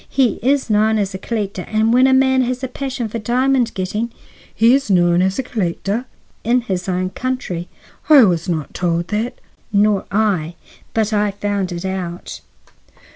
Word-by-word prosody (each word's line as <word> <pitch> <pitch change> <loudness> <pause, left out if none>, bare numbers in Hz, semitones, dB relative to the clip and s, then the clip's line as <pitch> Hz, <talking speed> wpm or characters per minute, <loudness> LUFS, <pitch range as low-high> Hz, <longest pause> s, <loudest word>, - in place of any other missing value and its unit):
He 260 -4 +1
is 270 +3 +1
known 215 0 +3
as 200 -2 -1
a 190 - -5
collector, 200 -3 -3
and 220 +1 +2
when 255 +2 +5
a - - +3
man 265 0 +4
has 255 +1 -2
a - - 0
passion 255 -2 -4
for 230 +2 -5
diamond 250 +2 +1
getting—" 210 +5 -2 0.4
"He 230 +3 +4
is 270 -4 +1
known 175 -2 +4
as 190 +1 +1
a 265 - -1
collector?" 210 +1 -2 0.4
"In 245 +2 +2
his 190 -5 -3
own 185 0 -1
country." 195 -8 -3 0.4
"I 290 -4 +9
was 175 -3 +1
not 155 -4 -3
told 170 -1 -1
that." 215 +3 -2 0.4
"Nor 205 -1 +2
I. 190 -6 0 0.4
But 220 -1 +1
I 210 0 +2
found 200 -2 -2
it 175 +1 -5
out." 180 -2 -5
210 Hz, 175 wpm, -19 LUFS, 185-245 Hz, 0.4 s, I